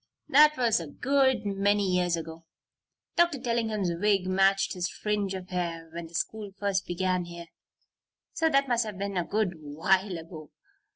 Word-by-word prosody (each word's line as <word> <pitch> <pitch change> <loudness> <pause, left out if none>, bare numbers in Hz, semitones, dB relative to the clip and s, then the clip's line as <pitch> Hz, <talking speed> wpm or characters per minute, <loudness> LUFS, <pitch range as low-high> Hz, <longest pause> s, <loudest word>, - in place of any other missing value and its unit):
That 300 +1 +6
was 235 -5 +2
a 165 - -6
good 265 - +1
many 200 0 +1
years 180 -2 +1
ago. 165 0 -8 0.7
Dr. 340 -5 +3
Tellingham's 225 -6 -1
wig 195 +1 +1
matched 195 +1 +2
his 180 -1 -2
fringe 205 -2 -2
of 185 -1 -8
hair 170 -3 -4
when 170 -1 -6
the 165 - -13
school 215 +4 -3
first 195 -2 -1
began 180 0 -1
here, 170 -1 -10 0.8
so 325 0 +2
that 275 -2 +2
must 240 -1 +2
have 210 -3 -7
been 200 0 -3
a 180 - +1
good 205 0 -1
while 175 +6 0
ago. 160 -2 -10
195 Hz, 165 wpm, -28 LUFS, 175-215 Hz, 0.8 s, That